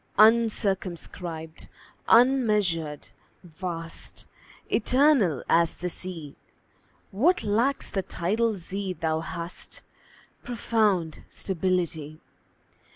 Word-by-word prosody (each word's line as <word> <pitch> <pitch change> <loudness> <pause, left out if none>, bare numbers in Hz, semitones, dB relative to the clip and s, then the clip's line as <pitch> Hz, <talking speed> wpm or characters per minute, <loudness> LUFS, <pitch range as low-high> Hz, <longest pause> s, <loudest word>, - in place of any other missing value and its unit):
UNCIRCUMSCRIBED, 190 -7 +1 0.4
unmeasured, 210 - +3 0.3
vast, 165 -1 -6 0.5
Eternal 250 - +3
as 170 0 +3
the 180 - -3
Sea; 165 -5 -6 0.8
What 290 - +2
lacks 230 +7 +1
the 195 - 0
tidal 215 +6 0
sea 190 +2 -4
thou 160 -2 -1
hast 170 +1 -7 0.6
Profound 210 -8 0
stability. 170 -4 -2
185 Hz, 75 wpm, -26 LUFS, 165-220 Hz, 0.8 s, unmeasured